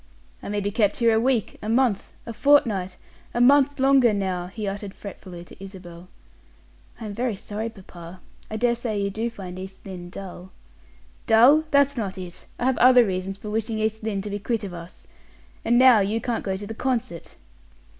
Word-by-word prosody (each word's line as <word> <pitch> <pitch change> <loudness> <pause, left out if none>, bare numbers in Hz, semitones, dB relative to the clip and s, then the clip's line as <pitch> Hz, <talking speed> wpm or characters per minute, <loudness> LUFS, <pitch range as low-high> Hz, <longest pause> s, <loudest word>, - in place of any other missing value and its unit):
"I - - -7
may 205 0 -1
be 200 +1 -2
kept 205 -2 +1
here 230 -2 +3
a 220 - +3
week 240 -3 0
a 210 - -5
month 230 -4 +1 0.2
a 230 - -6
fortnight 210 -10 +2 0.4
a - - +1
month 280 +3 +4
longer, 265 -4 +5
now!" 185 -3 -2
he 210 +2 -6
uttered 200 0 -5
fretfully 185 -3 -10
to 190 - -14
Isabel. 180 -3 -11 0.9
"I 225 - -7
am 210 - -5
very 235 0 -1
sorry, 210 +3 -5
papa. 180 -4 -12 0.3
I 215 - -4
dare 240 +1 +2
say 230 -3 -3
you 200 0 -1
do 225 +4 -2
find 185 -5 -9
East 190 0 -10
Lynne 180 -2 -8
dull." 185 -1 -9 0.8
"Dull! 255 +8 +6
That's 280 -1 +3
not 200 -4 -3
it; 180 -2 -9
I 245 - -2
have 260 -1 +1
other 250 -1 +7
reasons 190 0 -3
for 210 +1 -7
wishing 220 +1 -2
East 220 0 -1
Lynne 210 -3 -3
to 205 - -5
be 205 - -3
quit 225 +1 -2
of 195 -3 -6
us. 170 +1 -10 0.6
And 240 - +3
now 255 -3 +7
you 205 +3 0
can't 235 -1 -3
go 190 -1 -2
to 205 - -7
the 220 - -6
concert." 230 -9 -3
210 Hz, 195 wpm, -24 LUFS, 190-235 Hz, 0.9 s, other